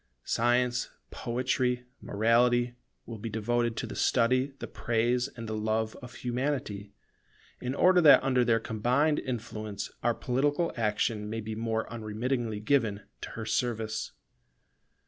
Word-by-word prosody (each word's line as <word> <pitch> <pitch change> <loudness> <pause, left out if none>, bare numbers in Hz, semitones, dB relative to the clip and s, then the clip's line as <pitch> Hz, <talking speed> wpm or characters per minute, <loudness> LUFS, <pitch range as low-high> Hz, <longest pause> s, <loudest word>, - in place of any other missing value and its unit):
Science, 120 +1 +1 0.2
Poetry, 125 0 -1 0.2
Morality, 120 +3 +3 0.3
will 115 -2 -7
be 115 - -4
devoted 115 +2 0
to - - -2
the - - -7
study, 130 +3 +3
the - - -5
praise, 120 +2 0
and 115 -4 -9
the 110 - -3
love 110 +1 -1
of 125 0 -10
Humanity, 125 -5 -2 0.7
in 125 +2 -3
order 180 +2 +5
that 145 -5 +8
under 130 -2 +3
their 115 -2 +3
combined 125 +8 +1
influence, 110 -5 -5
our 120 -1 +2
political 145 +6 0
action 105 -1 0
may 115 +1 -3
be 110 0 -5
more 110 0 -1
unremittingly 115 0 -2
given 110 -3 +1 0.2
to - - -5
her - - -4
service. 110 -3 -1
120 Hz, 135 wpm, -29 LUFS, 110-125 Hz, 0.7 s, that